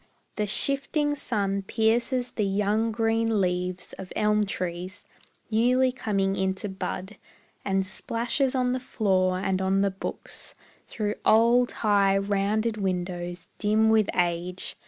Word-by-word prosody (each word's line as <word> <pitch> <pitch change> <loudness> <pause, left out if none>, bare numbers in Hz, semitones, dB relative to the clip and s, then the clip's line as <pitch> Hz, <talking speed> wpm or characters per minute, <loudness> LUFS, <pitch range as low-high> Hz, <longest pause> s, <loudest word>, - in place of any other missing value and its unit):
The 210 -1 -1
shifting 280 - 0
sun 200 -8 -1
pierces 235 +5 0
the 215 - -1
young 210 +3 +1
green 225 0 +1
leaves 180 -1 -2
Of 185 - -8
elm 210 -1 +2
trees, 185 +1 -5 0.5
newly 250 +4 +3
coming 195 -6 -1
into 190 +2 -1
bud, 190 +1 -5 0.5
And 195 -1 0
splashes 240 +7 -1
on 250 -1 +1
the 255 - -1
floor 185 -7 +1
and 190 0 -1
on 190 +1 +2
the 200 0 +2
books 190 - -7 0.3
Through 210 -2 -2
old, 235 +3 +4
high, 200 -2 +4
rounded 205 +3 0
windows, 180 -2 -3
dim 215 +1 +3
with 215 -2 +3
age. 175 +1 -1
205 Hz, 130 wpm, -26 LUFS, 190-225 Hz, 0.5 s, old